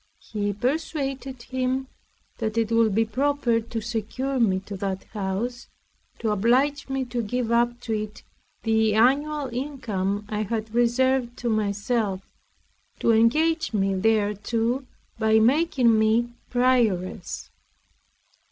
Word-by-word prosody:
He 205 -1 -3
persuaded 270 - -3
him, 260 +1 -1 0.5
that 220 0 -2
it 225 -1 +1
would 230 -3 +3
be 225 +1 +3
proper 255 0 +1
to 225 0 -5
secure 240 +4 -2
me 195 -5 +3
to 200 +1 -8
that 190 0 -3
house, 215 +5 -3 0.5
to 225 -2 -1
oblige 255 +8 +2
me 270 -1 -1
to 245 -1 -2
give 235 +2 -2
up 240 +1 +2
to 230 -2 -3
it 215 0 -4 0.4
the 220 -1 +2
annual 280 +5 +2
income 210 -7 -2
I 210 0 -2
had 220 +1 -3
reserved 240 +1 +2
to 240 - -2
myself; 205 -1 0 0.8
to 230 - +2
engage 310 +8 +3
me 195 -2 +1
thereto, 225 +5 0 0.3
by 220 0 +4
making 245 -1 +4
me 230 +2 +2 0.2
prioress. 225 -8 0
230 Hz, 125 wpm, -25 LUFS, 215-255 Hz, 0.8 s, by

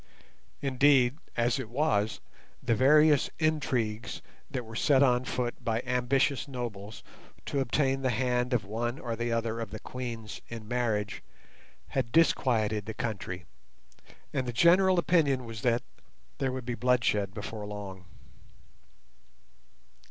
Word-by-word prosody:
Indeed, 135 0 +4 0.2
as 120 +3 +2
it 120 -4 -5
was, 110 -6 0 0.4
the 120 -2 +2
various 150 +4 +5
intrigues 125 -8 -1 0.3
that 130 -4 -4
were 110 0 -10
set 135 +3 +4
on 125 -1 +3
foot 125 -2 -3
by 115 +1 0
ambitious 125 +3 +1
nobles 110 -6 -6 0.4
to 140 - -1
obtain 135 +1 +1
the 130 - +1
hand 125 +1 0
of 120 -5 +1
one 120 +5 -2
or 120 -7 -6
other 115 0 -1
of 115 -3 -4
the - - -7
queens 115 -4 -6
in 115 -2 -8
marriage 110 -4 -1 0.7
had 125 -4 -1
disquieted 110 -10 +2
the 110 - -5
country, 95 -7 -4 0.9
and 130 -2 -1
the 120 - -3
general 185 +7 +5
opinion 145 -6 +2
was 115 -2 -7
that 120 -1 +1 0.6
there 135 -1 0
would 130 -1 -5
be 120 - -2
bloodshed 120 -5 +1
before 105 0 -6
long. 100 -3 -7
120 Hz, 130 wpm, -29 LUFS, 110-135 Hz, 0.9 s, various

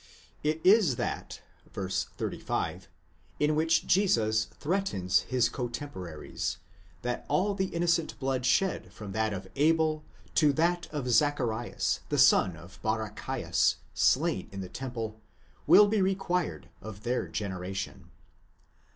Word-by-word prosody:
It 155 +1 0
is 190 - +5
that - - -4 0.3
(v. 95 -2 -4
35) 95 - -3 0.5
in 150 +1 +3
which 160 +2 +2
Jesus 110 - +3
threatens 145 - 0
his 125 -2 +3
cotemporaries, 120 - -5 0.5
that 125 0 -2
all 200 +2 +2
the 190 -1 0
innocent 170 -2 0
blood 130 -1 -1
shed 180 +9 +1
from 105 -2 -8
that 110 +1 0
of 95 -1 -5
Abel 155 +1 +2 0.3
to 150 -2 +4
that 175 +3 +1
of 145 -4 -3
Zacharias, 120 -2 +1
the - - 0
son 90 -4 +5
of 85 +4 -14
Bara 110 -1 -1
chias, - - 0 0.2
slain - - +2
in 100 0 -6
the 90 - -7
temple, 115 -4 -5 0.5
will 210 - +8
be 210 -1 +1
required 180 - -1
of 105 -1 -9
their 125 +1 -1
generation. 95 -2 -5
125 Hz, 125 wpm, -29 LUFS, 105-165 Hz, 0.5 s, will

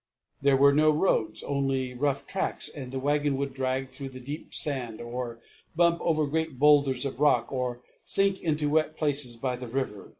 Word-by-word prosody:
There 140 -1 +4
were 140 +1 +6
no 155 +2 +4
roads, 150 - +1
only 135 -2 -1
rough 140 +2 -1
tracks, 195 - -3
and 130 -4 -8
the 135 - -4
wagon 145 0 +1
would 140 -1 -3
drag 130 0 -2
through 135 0 -7
the 130 -1 -10
deep 140 +5 -7
sand, 125 -7 0
or 120 0 -5 0.4
bump 170 0 +3
over 155 -2 +1
great 160 -1 -2
boulders 140 -2 +4
of 135 -2 -4
rock, 150 0 +3
or 125 -2 -3 0.2
sink 195 -1 +1
into 150 -2 +1
wet 155 +1 +1
places 140 -6 0
by 125 +1 -2
the 125 0 -7
river. 115 -5 -4
140 Hz, 185 wpm, -27 LUFS, 125-150 Hz, 0.4 s, were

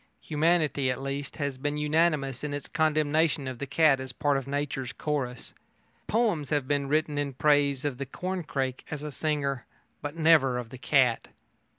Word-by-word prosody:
Humanity, 155 -3 +1
at 125 - -1
least, 140 +1 -4
has 140 -3 -3
been 145 +2 -1
unanimous 150 -3 +1
in 145 -1 -2
its 145 - -6
condemnation 155 -1 +1
of 130 -2 -5
the 140 - -4
cat 145 -1 +4
as 130 -1 -5
part 145 +2 +1
of 135 -1 -2
nature's 140 -3 -3
chorus. 135 -5 -3 0.5
Poems 205 - +1
have 145 -3 0
been 140 -1 0
written 150 0 +1
in 140 -1 -2
praise 145 -1 +2
of 140 -3 -2
the 140 - -4
corncrake 145 -6 -3
as 150 -1 -5
a 150 - -4
singer, 140 -3 -2 0.3
but 145 +1 -5
never 155 -6 +4
of 120 -2 -6
the 130 - -9
cat. 125 -3 +2
145 Hz, 175 wpm, -28 LUFS, 135-155 Hz, 0.5 s, cat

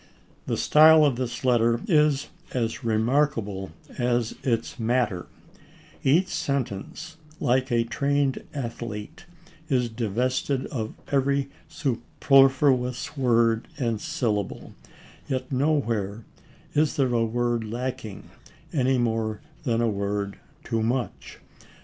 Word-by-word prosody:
The - - 0
style 155 0 +7
of 140 -4 +2
this 125 +2 -4
letter 120 -2 +3
is 150 -6 +3 0.3
as 120 +1 -1
remarkable 110 -4 0 0.3
as 120 -2 +1
its 115 -3 -1
matter; 115 -5 0 0.8
each 165 +8 +3
sentence, 140 +3 -3 0.2
like 130 +2 +1
a 115 -1 +3
trained 140 +3 0
athlete, 115 -3 -6 0.4
is 125 -4 +1
divested 125 +4 -1
of 110 -5 -4 0.2
every 140 0 +1 0.2
superfluous 135 0 +2
word 115 -4 +2
and 115 -6 -1
syllable, 105 -5 -2 0.5
yet 130 0 -3
nowhere 115 -7 0 0.5
is 150 +1 +2
there 135 -5 +1
a 115 -1 +3
word 120 0 0
lacking, 115 -2 -5 0.4
any 130 -2 +2
more 110 -3 0 0.3
than 115 -3 +1
a 120 - +2
word 100 -1 -2 0.2
too 115 - -1
much. 120 -1 -2
120 Hz, 105 wpm, -25 LUFS, 115-135 Hz, 0.8 s, style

